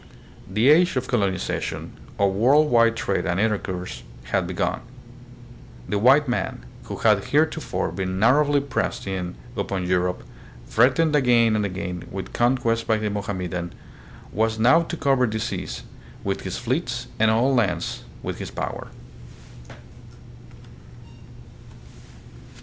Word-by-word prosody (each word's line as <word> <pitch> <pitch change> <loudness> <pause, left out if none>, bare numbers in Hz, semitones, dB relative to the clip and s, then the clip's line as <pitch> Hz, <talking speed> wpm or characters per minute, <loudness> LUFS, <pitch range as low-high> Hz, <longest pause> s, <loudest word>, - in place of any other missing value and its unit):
The 110 +7 +3
age 175 +2 +4
of 130 0 -1
colonization, 100 -7 -2 0.2
of 100 -1 +2
world 140 +9 +4
wide 115 -1 +4
trade 95 -6 -1
and 85 +1 0
intercourse, 100 -4 -2 0.2
had - - -1
begun. - - -2 1.1
The 105 - 0
white 135 +6 +5
man, 125 - -2 0.2
who - - -5
had - - +3
heretofore - - 0
been 95 -1 -3
narrowly 140 +7 +4
pressed 140 -1 -2
in 95 -4 -4 0.2
upon 95 -2 -2
Europe, 90 0 0 0.4
threatened 140 +7 +3
again 120 -5 +4
and 105 - +1
again 90 -1 -5
with 95 0 -6
conquest 120 -2 +1
by 110 - +3
the 105 -1 -2
Mohammedan, 90 -4 -4 0.6
was 110 +1 0
now 125 +9 +5
to 170 0 -5
cover 135 -4 +2
the 110 0 -3
seas 100 -5 -4 0.4
with - - -2
his - - -4
fleets - - -2
and 110 0 +4
all 120 +5 +3
lands 120 -7 0 0.2
with - - -4
his - - -5
power. - - -5
110 Hz, 125 wpm, -23 LUFS, 95-125 Hz, 1.1 s, white